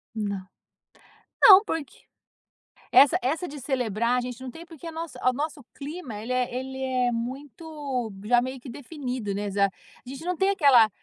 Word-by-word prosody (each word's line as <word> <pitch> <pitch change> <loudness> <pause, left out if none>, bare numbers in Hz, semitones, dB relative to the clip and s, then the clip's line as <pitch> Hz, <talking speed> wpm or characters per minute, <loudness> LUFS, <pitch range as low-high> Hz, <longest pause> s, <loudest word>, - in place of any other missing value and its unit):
Não. 200 -3 -3 1.0
Não, 395 +1 +10
porque 325 -8 -3 1.1
essa 280 - +7
essa 315 +8 -1
de 290 0 -8
celebrar 245 -3 0
a - - +1
gente 250 +1 -6
não 255 -1 -6
tem, 335 +4 -11
porque 335 -1 -11
a - - -5
nossa 320 -6 -6
o - - 0
nosso 295 0 -4
clima 285 -5 -7
ele 225 +4 -4
é 250 -1 0
ele 265 +1 -5
é 255 -2 +1
muito 265 0 -4
já 240 +3 +4
meio 260 +1 -4
que 250 - -10
definido, 250 -6 -5
né, 205 +1 -3
exa 200 0 +2 0.4
gente 270 +5 -8
não 360 0 0
tem 385 +1 +3
aquela 270 - +6
260 Hz, 175 wpm, -26 LUFS, 240-300 Hz, 1.1 s, Não